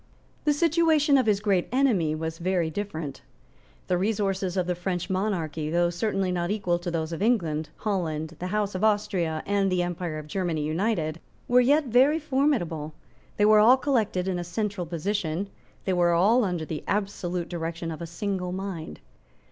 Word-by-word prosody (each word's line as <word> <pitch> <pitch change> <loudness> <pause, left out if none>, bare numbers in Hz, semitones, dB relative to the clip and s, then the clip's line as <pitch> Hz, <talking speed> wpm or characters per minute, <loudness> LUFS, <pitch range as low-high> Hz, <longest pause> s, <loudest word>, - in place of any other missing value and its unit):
The 300 - +4
situation 315 -2 +3
of 260 -4 +3
his 205 -2 +3
great 195 -4 +1
enemy 220 - +2
was 160 +1 -4
very 175 -2 0
different. 160 -7 -5 0.6
The 180 -1 0
resources 195 -2 -1
of 180 - +1
the 180 - 0
French 180 +1 -3
monarchy, 165 -6 -1
though 175 +1 +2
certainly 195 +1 -1
not 175 -1 -1
equal 185 -5 0
to 175 0 -4
those 165 -1 -2
of 165 - -5
England, 165 -10 +1
Holland, 165 -6 -2
the 180 - -3
House 205 +1 -1
of 185 +2 -3
Austria, 205 -7 +1
and 200 -1 +1
the 180 -1 +2
Empire 175 -2 -3
of 155 - -7
Germany 165 -2 -2
united, 165 0 -1 0.3
were 250 +1 +5
yet 290 +4 +3
very 260 +5 +4
formidable; 255 - 0 0.4
they 205 - +4
were 215 0 +7
all 240 +5 +7
collected 220 -9 0
in 185 -2 -1
a - - -3
central 185 0 -3
position; 180 +1 -2 0.4
they 190 - +1
were 175 -1 +3
all 210 +9 +4
under 175 -5 -2
the 155 -1 -5
absolute 190 -4 -2
direction 165 -1 -4
of 160 - -7
a 170 - -4
single 180 +1 -3
mind. 180 - -5
185 Hz, 175 wpm, -26 LUFS, 165-210 Hz, 0.6 s, were